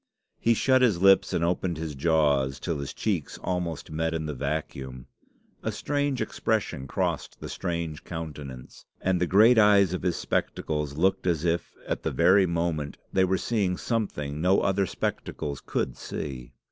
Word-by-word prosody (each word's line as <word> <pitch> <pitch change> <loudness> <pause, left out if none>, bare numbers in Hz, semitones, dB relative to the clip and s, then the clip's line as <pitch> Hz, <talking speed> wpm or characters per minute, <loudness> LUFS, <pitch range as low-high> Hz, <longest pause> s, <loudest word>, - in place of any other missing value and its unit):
He 115 0 +3
shut 130 +3 +3
his 110 -9 +3
lips 95 +1 +5
and 85 - 0
opened 85 0 0
his 80 -1 -4
jaws 70 -3 +2
till 70 - -2
his 70 - -4
cheeks 90 -10 -2
almost 90 -5 -3
met 80 +1 -1
in 80 -1 -2
the 75 - -3
vacuum. 65 -3 -4 0.6
A - - -2
strange 145 -2 -1
expression 65 - -2
crossed - - -2
the - - -6
strange 85 -4 -4
countenance, 75 -6 -8
and 95 -1 0
the 90 - +2
great 110 +6 +6
eyes 100 -4 +5
of 90 - -2
his 90 -2 0
spectacles 75 -2 -2
looked 95 +2 +2
as 85 -2 +1
if, 85 0 -1
at - - -2
the - - -1
very 95 +3 +4
moment, 85 -4 -2 0.2
they 95 - +4
were 95 +1 +1
seeing 100 -6 0
something 75 - -2
no 95 +3 +4
other 95 0 +1
spectacles 70 -3 -3
could 60 - -2
see. 65 -4 -6
85 Hz, 165 wpm, -27 LUFS, 75-95 Hz, 0.6 s, great